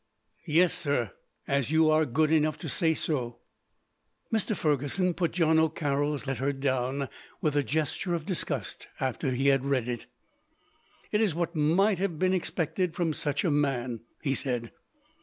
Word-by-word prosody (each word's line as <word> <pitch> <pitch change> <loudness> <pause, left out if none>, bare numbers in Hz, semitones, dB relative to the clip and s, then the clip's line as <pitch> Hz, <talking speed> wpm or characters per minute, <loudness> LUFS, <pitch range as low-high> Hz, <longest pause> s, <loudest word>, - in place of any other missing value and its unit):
"Yes, 170 +3 +4
sir, 140 - -1 0.4
as 140 -2 +1
you 160 0 +4
are 155 0 +3
good 155 +5 +2
enough 155 -1 +2
to - - -6
say 160 -3 +1
so." 125 -8 -2 1.0
Mr. 220 0 +1
Fergusson 150 +5 +1
put 170 -1 -1
John 160 -2 +3
O'Carroll's 145 -2 0
letter 135 +1 -1
down, 135 0 -1 0.3
with 150 -2 0
a 145 - +4
gesture 155 - -1
of 160 -2 -4
disgust, 185 -4 -2
after 130 0 -1
he 135 +3 +2
had 135 -1 +3
read 135 -4 0
it. 120 -2 -4 1.0
"It 210 - +2
is 200 -8 +2
what 170 0 -2
might 175 +6 +3
have 185 -4 -1
been 185 +3 +2
expected 175 -1 -1
from 165 -3 0
such 145 -1 -1
a 175 - +2
man," 130 -5 0 0.2
he 135 -3 +1
said. 125 -4 -2
150 Hz, 160 wpm, -28 LUFS, 135-165 Hz, 1.0 s, Yes